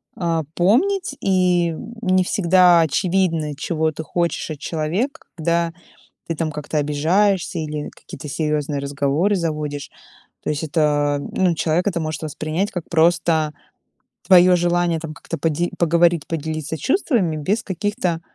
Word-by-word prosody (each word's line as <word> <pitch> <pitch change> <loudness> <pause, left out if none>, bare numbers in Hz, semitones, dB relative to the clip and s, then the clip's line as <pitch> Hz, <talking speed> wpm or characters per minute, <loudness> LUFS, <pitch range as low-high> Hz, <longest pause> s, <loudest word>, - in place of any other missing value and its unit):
а, 165 -3 -1
помнить. 295 - +2
И, 180 -3 +2
м, 230 +8 -8
не 185 -3 +3
всегда 180 -2 +4
очевидно, 165 -1 0
чего 160 +2 -1
ты 155 +1 -6
хочешь 170 +1 -2
от 150 - -6
человека, 170 - -2
когда 170 0 0 0.5
ты 165 - -2
там 155 0 -2
как-то 150 +1 -4
обижаешься 170 +6 +1
или 150 -1 -4
какие-то 145 - -11
серьёзные 150 -1 -1
разговоры 140 +7 0
заводишь. 150 -5 -3 0.5
То - - -2
есть 150 +1 -3
это, 145 -1 +1
ну, 180 -3 +1
человек 165 +4 0
это 180 -4 0
может 155 -1 -3
воспринять 155 +5 -2
как 175 -3 -5
просто 165 -2 +2 0.8
твоё 180 -1 +7
желание 175 -1 +1
там 160 -1 -7
как-то 165 - -6
поде 165 +3 0
поговорить, 170 -2 +3
поделиться 160 -1 -3
чувствами 240 - +1
без 200 +10 -1
каких-то 195 -3 -2
165 Hz, 135 wpm, -21 LUFS, 155-180 Hz, 0.8 s, твоё